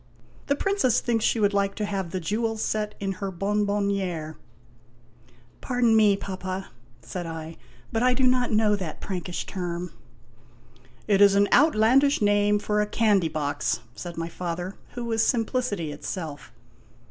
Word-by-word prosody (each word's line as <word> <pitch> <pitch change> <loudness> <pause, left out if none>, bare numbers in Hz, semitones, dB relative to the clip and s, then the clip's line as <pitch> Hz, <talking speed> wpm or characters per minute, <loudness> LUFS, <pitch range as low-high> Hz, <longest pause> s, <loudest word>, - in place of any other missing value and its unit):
The 280 - +2
Princess 340 - +2
thinks 230 -3 0
she 230 - +2
would 205 -1 +2
like 200 0 +1
to 210 - -2
have 195 -3 -3
the 185 - -3
jewels 220 +5 -1
set 210 -1 -2
in 195 -2 -2
her 195 - -1
bonbonniere" 200 -4 -1 1.3
"Pardon 245 -3 +2
me, 210 -2 +5
Papa," 190 -1 -5 0.3
said 175 -2 -5
I, 160 0 -6 0.4
"but 225 - 0
I 250 0 +3
do 260 - 0
not 250 -1 +3
know 215 -1 +3
that 185 -6 -5
Prankish 180 -2 -4
term." 175 -2 -4 0.6
" 120 0 -28 0.2
It 200 -1 +3
is 200 -1 +7
an 200 0 +4
outlandish 280 0 +4
name 205 0 +3
for 210 0 0
a 210 - 0
candy 205 -6 +2
box," 145 -2 -1
said 175 -2 -8
my 165 0 -2
father, 175 +2 -4 0.2
who 245 -1 -5
was 225 -1 +1
simplicity 225 - 0
itself. 150 -1 -6
200 Hz, 155 wpm, -25 LUFS, 180-225 Hz, 1.3 s, is